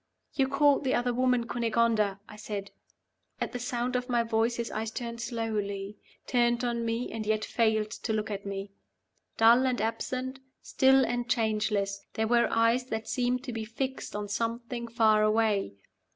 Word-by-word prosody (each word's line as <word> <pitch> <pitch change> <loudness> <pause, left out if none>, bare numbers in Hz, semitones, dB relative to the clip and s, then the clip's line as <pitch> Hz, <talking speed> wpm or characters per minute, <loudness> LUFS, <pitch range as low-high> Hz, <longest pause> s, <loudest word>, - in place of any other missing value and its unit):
"You 270 -2 +2
called 280 +1 +3
the 260 - +1
other 245 0 0
woman 250 -1 +2
Cunegonda," 225 -3 +1
I 210 - -11
said. 210 -2 -6 0.7
At - - -2
the 245 - -4
sound 245 +1 -2
of 250 +1 -2
my 240 -1 +2
voice 225 +1 +1
his 235 0 -3
eyes 220 +1 -3
turned 235 0 -5
slowly 210 -4 -3 0.3
turned 240 -1 +2
on 235 -1 -1
me, 230 +2 -2
and 225 -1 -4
yet 215 0 0
failed 220 -2 +1
to 230 - -4
look 215 0 -1
at 200 -1 -4
me. 195 0 -5 0.7
Dull 235 +3 +6
and 250 -1 0
absent, 255 +4 -3 0.2
still 265 0 +4
and 245 0 -2
changeless, 210 -3 0
they 220 - +1
were 235 +1 +3
eyes 230 +2 +2
that 220 -3 -4
seemed 250 0 0
to 255 -3 -5
be 225 -1 -3
fixed 260 +4 -4
on 210 0 -3
something 235 +3 -3
far 220 -2 +3
away. 215 - +2
230 Hz, 170 wpm, -29 LUFS, 215-245 Hz, 0.7 s, Dull